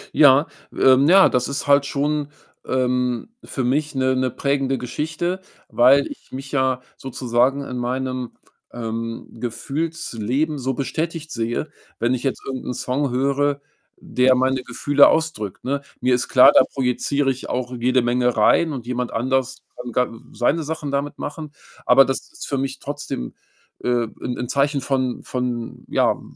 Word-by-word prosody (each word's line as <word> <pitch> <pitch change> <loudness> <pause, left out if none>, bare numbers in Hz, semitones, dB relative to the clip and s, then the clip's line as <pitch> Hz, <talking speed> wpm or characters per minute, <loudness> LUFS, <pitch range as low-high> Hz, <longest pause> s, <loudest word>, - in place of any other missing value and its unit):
Ja, 145 0 +7 0.3
ähm, 130 +2 +5
ja, 190 +1 +8
das 125 -1 0
ist 140 +1 -3
halt 140 -1 +4
schon, 145 +1 -1 0.4
ähm, 125 - 0
für 130 - -4
mich 145 +3 0
'ne 130 0 +2
'ne 130 0 +1
prägende 135 0 0
Geschichte, 160 +8 -3 0.3
weil 135 +4 +5
ich - - -11
mich 135 +1 -7
ja 130 -2 +1 0.2
sozusagen 130 +1 0
in 125 - -5
meinem, 130 0 -3 0.4
ähm, 115 0 -5
Gefühlsleben 140 +1 -2
so 130 0 -2
bestätigt 155 +4 -3
sehe, 115 +6 -2 0.3
wenn 120 +2 +1
ich 125 - -2
jetzt 135 -1 -2
irgend 130 -1 -5
'n 125 - -3
Song 135 +2 -1
höre, 140 +2 +1 0.4
der 130 0 +2
meine 130 +1 +1
Gefühle 145 +4 +4
ausdrückt, 160 - -1
ne? 140 +2 -1 0.2
Mir 125 0 +2
ist 125 - 0
klar, 125 - +7
da - - +7
projiziere 135 +2 0
ich 130 - -7
auch 125 0 -3
jede 125 +1 +2
Menge 125 0 +1
rein, 160 +9 +4
und 130 -5 -6
jemand 125 0 -3
anders 130 +2 -1 0.2
kann 120 -1 -7
ga 125 +2 +1 0.2
seine 145 +7 +1
Sachen 155 -2 -4
damit 140 +1 -2
machen. 150 0 -6 0.3
Aber 135 +2 +7
das 135 - -1
ist - - -8
für 140 -2 -1
mich 135 0 -3
trotzdem, 145 - -5 0.5
äh, 120 -1 +1 0.2
'n 125 - -3
'n 125 - -3
Zeichen 140 +2 +1
von 130 -2 -1
von, 125 -2 -4
ja, - - +3
W - - -15
130 Hz, 160 wpm, -22 LUFS, 125-140 Hz, 0.5 s, ja